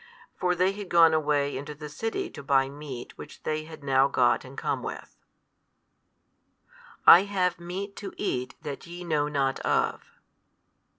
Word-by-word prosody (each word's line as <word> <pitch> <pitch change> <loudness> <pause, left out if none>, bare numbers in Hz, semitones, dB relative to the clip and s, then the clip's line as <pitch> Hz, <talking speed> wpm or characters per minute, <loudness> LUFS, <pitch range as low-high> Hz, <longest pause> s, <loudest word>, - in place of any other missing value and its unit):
For 180 -1 0
they 185 +2 +2
had 200 -2 -8
gone 165 -2 +6
away 145 -2 +1
into 145 +3 -6
the 150 +1 -8
city 225 - -3
to - - -9
buy 135 -1 +2
meat 140 -4 -8
which - - -11
they 155 0 -2
had 160 -2 -11
now 135 -1 +4
got 125 -3 +2
and 130 +1 -12
come - - -2
with. - - -7 1.9
I 180 +4 +9
have 185 -4 0
meat 190 +4 -6
to 200 - -6
eat 125 -10 -2
that 145 +2 -6
YE 175 +1 -8
know 150 -4 0
not 140 -2 0
of. - - 0
150 Hz, 160 wpm, -27 LUFS, 140-180 Hz, 1.9 s, I